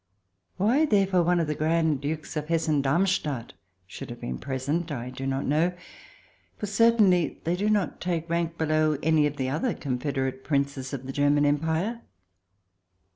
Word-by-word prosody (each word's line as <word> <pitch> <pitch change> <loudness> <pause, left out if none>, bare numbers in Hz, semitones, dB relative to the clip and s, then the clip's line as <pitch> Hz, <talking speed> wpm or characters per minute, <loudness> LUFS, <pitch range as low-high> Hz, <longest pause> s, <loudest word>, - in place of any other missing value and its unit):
Why, 235 +11 +3
therefore, 195 -6 +3
one 175 +1 +2
of 165 - +1
the 150 - -1
Grand 155 -2 +1
Dukes 155 +3 -4
of 150 -1 -3
Hessen 160 -3 +1
Darmstadt 150 -3 0 0.3
should 95 - -9
have - - -8
been 60 0 -5
present 145 +5 -2
I 125 -2 -4
do 135 +1 -5
not 135 0 -1
know, 160 +5 +2 0.8
for - - -4
they 205 - -6
certainly 205 -5 +3
do 180 +5 0
not 205 -3 0
take 170 -2 -2
rank 170 0 -1
below 155 -1 +1
any 155 -1 +4
of 145 0 -6
the 130 -1 -1
other 210 - -1
confederate 130 -1 -3
Princes 140 -2 -1
of 135 -2 -5
the 135 - -5
German 145 +1 +3
Empire. 160 +10 0
155 Hz, 165 wpm, -26 LUFS, 140-175 Hz, 0.8 s, any